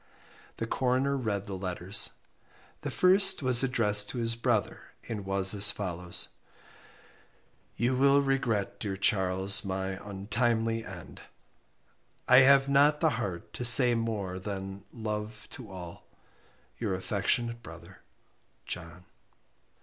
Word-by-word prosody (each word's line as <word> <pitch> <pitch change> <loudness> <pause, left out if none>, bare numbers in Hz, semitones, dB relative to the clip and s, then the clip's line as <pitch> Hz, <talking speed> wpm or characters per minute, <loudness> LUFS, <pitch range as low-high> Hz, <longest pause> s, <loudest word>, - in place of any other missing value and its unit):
The 115 - -3
Coroner 130 +3 0
read 105 -6 -3
the 100 -2 -6
letters. 95 +2 -1 0.7
The - - -4
first 190 -2 +3
was 125 -2 +4
addressed 105 -5 +1
to - - -6
his 115 -1 0
brother, 115 -2 -1 0.3
and 105 -4 -6
was 95 0 +5
as 100 0 +6
follows: 90 -3 -3 1.5
"You 125 +2 0
will 140 +2 +4
regret 130 -7 -2
dear 100 -3 -4
Charles 95 -1 +1
my 95 -1 -4
untimely 115 +3 -2
end. 90 -4 -11 1.1
I 125 - +6
have 135 +1 +6
not 145 +2 +3
the 160 -1 +2
heart 90 -6 -6
to - - -6
say 125 0 +8
more 105 -5 -3
than 95 0 -7
love 105 -2 -6
to 120 -5 -10
all. 90 -2 -10 0.7
Your 105 -5 -2
affectionate 115 +5 -2
brother 85 +2 -13 0.6
JOHN." 90 0 -8
105 Hz, 120 wpm, -28 LUFS, 95-125 Hz, 1.5 s, say